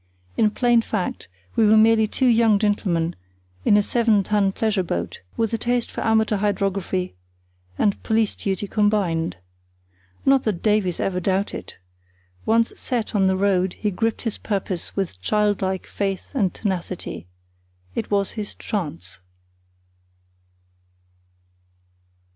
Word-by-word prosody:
In 215 Hz, -, +3 dB
plain 240 Hz, +1 st, +3 dB
fact 215 Hz, -5 st, -3 dB, 0.3 s
we -, -, +4 dB
were 215 Hz, +1 st, +6 dB
merely 220 Hz, 0 st, +5 dB
two 260 Hz, -, 0 dB
young 230 Hz, -3 st, +5 dB
gentlemen 190 Hz, -5 st, 0 dB, 0.5 s
in 205 Hz, -, +5 dB
a 205 Hz, -, +3 dB
seven 225 Hz, -3 st, +2 dB
ton 200 Hz, -1 st, +2 dB
pleasure 215 Hz, -1 st, 0 dB
boat, 90 Hz, -, -4 dB, 0.2 s
with 225 Hz, -1 st, 0 dB
a 225 Hz, -, 0 dB
taste 240 Hz, +1 st, 0 dB
for -, -, -5 dB
amateur 220 Hz, -1 st, +2 dB
hydrography 195 Hz, -2 st, -1 dB, 0.6 s
and 205 Hz, -2 st, +1 dB
police 220 Hz, -1 st, +1 dB
duty 195 Hz, 0 st, -2 dB
combined. 195 Hz, -, +1 dB, 0.9 s
Not 270 Hz, -1 st, +5 dB
that 205 Hz, -6 st, -1 dB
Davies 210 Hz, -5 st, +2 dB
ever 180 Hz, -1 st, 0 dB
doubted. 190 Hz, +2 st, -2 dB, 0.7 s
Once 230 Hz, +1 st, +3 dB
set 235 Hz, -3 st, -2 dB
on 195 Hz, -3 st, +3 dB
the 190 Hz, 0 st, +2 dB
road 190 Hz, -2 st, +2 dB
he 210 Hz, -, -2 dB
gripped 225 Hz, +4 st, -1 dB
his 225 Hz, -3 st, -3 dB
purpose 195 Hz, -4 st, -3 dB
with 180 Hz, -, -3 dB
child 210 Hz, -, +1 dB
like 190 Hz, -1 st, -1 dB
faith 195 Hz, -2 st, -3 dB
and 205 Hz, -10 st, +1 dB
tenacity. 185 Hz, -, -4 dB, 0.7 s
It -, -, -3 dB
was 200 Hz, -1 st, +1 dB
his 210 Hz, -2 st, -5 dB
"chance". 95 Hz, -, -5 dB
205 Hz, 130 wpm, -23 LUFS, 190-220 Hz, 0.9 s, were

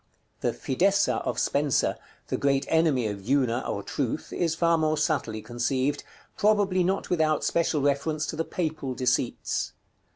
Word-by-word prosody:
The -, -, 0 dB
Fidessa 195 Hz, +9 st, +1 dB
of -, -, -1 dB
Spenser, 140 Hz, -2 st, +1 dB, 0.3 s
the -, -, 0 dB
great 140 Hz, -1 st, +1 dB
enemy 160 Hz, -7 st, +3 dB
of 100 Hz, -2 st, -4 dB
Una, 130 Hz, -3 st, +2 dB
or 100 Hz, -, -3 dB
Truth, 135 Hz, +5 st, -3 dB
is 165 Hz, -2 st, 0 dB
far 170 Hz, 0 st, +3 dB
more 155 Hz, -1 st, +1 dB
subtly 110 Hz, -11 st, -1 dB
conceived, 130 Hz, +4 st, -1 dB, 0.3 s
probably 200 Hz, -3 st, +3 dB
not 190 Hz, +2 st, -1 dB
without 155 Hz, -3 st, +2 dB
special 165 Hz, -3 st, +1 dB
reference 150 Hz, +2 st, 0 dB
to -, -, -4 dB
the 165 Hz, -, -1 dB
Papal 155 Hz, -7 st, -3 dB
deceits. 125 Hz, -1 st, -1 dB
150 Hz, 150 wpm, -27 LUFS, 130-165 Hz, 0.3 s, enemy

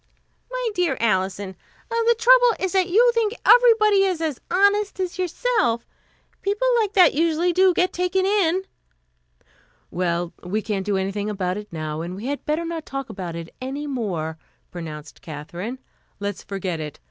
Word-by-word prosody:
"My -, -, -2 dB
dear 360 Hz, -3 st, 0 dB
Alison, 190 Hz, -2 st, 0 dB, 0.4 s
the 465 Hz, 0 st, +3 dB
trouble -, -, +6 dB
is 380 Hz, -1 st, -1 dB
that 375 Hz, 0 st, +2 dB
you 475 Hz, +6 st, +5 dB
think 460 Hz, -1 st, 0 dB
everybody 450 Hz, -4 st, +6 dB
is 370 Hz, -4 st, 0 dB
as 315 Hz, -5 st, -3 dB
honest 405 Hz, +2 st, +2 dB
as 370 Hz, -1 st, -3 dB
yourself. 365 Hz, -, 0 dB, 0.6 s
People 410 Hz, +5 st, 0 dB
like 425 Hz, -2 st, 0 dB
that 370 Hz, -2 st, +6 dB
usually 335 Hz, +3 st, +1 dB
do 375 Hz, +1 st, +5 dB
get 360 Hz, +1 st, +1 dB
taken 360 Hz, +1 st, 0 dB
in." 380 Hz, -2 st, +2 dB, 1.3 s
"Well, 175 Hz, -1 st, -1 dB
we 205 Hz, +4 st, -2 dB
can't 205 Hz, -3 st, -3 dB
do 200 Hz, -2 st, +1 dB
anything 195 Hz, +2 st, -2 dB
about 190 Hz, -2 st, -2 dB
it 210 Hz, 0 st, -9 dB
now, 155 Hz, -1 st, -4 dB
and 175 Hz, +2 st, -5 dB
we 205 Hz, +5 st, -7 dB
had 285 Hz, +2 st, -3 dB
better 310 Hz, +3 st, 0 dB
not 330 Hz, -1 st, -4 dB
talk 275 Hz, -2 st, -6 dB
about 175 Hz, -4 st, -6 dB
it 165 Hz, 0 st, -8 dB
any 275 Hz, +3 st, -4 dB
more," 180 Hz, -, -3 dB, 0.3 s
pronounced 155 Hz, -4 st, -8 dB
Katherine. 170 Hz, -, -6 dB, 0.4 s
"Let's 200 Hz, -1 st, -4 dB
forget 185 Hz, -4 st, -4 dB
it. 150 Hz, -2 st, -6 dB
290 Hz, 160 wpm, -23 LUFS, -, 1.3 s, trouble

